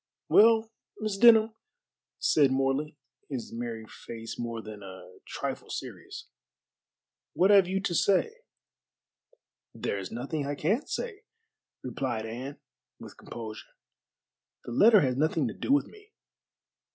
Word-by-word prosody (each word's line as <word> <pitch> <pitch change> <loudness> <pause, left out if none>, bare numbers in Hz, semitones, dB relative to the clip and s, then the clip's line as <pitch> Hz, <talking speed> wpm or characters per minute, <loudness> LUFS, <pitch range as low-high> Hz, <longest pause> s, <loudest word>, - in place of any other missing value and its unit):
"Well, 225 +1 +5 0.3
Miss 215 -2 -2
Denham," 220 0 +6 0.6
said 145 -3 +3
Morley, 135 +3 0 0.3
his 130 -6 -5
merry 115 -1 -5
face 115 +1 -9
more 115 -1 -4
than 110 -2 -9
a 95 -1 -12
trifle - - -5
serious, - - -7 1.1
"what 190 +4 +4
have 195 -3 +6
you 190 +1 0
to 190 - -2
say?" 200 - +2 1.4
"There 100 - -2
is 95 - -6
nothing 140 +6 -3
I 145 - -2
can 205 - 0
say," 445 -4 -4 0.6
replied 120 -3 -3
Anne, 125 +5 -7 0.4
with - - -11
composure, 110 -2 -9 0.9
"the - - -6
letter 210 - +6
has 130 -2 0
nothing 155 -1 +1
to - - -6
do - - -3
with 285 0 +4
me." 420 0 -17
145 Hz, 125 wpm, -28 LUFS, -, 1.4 s, Denham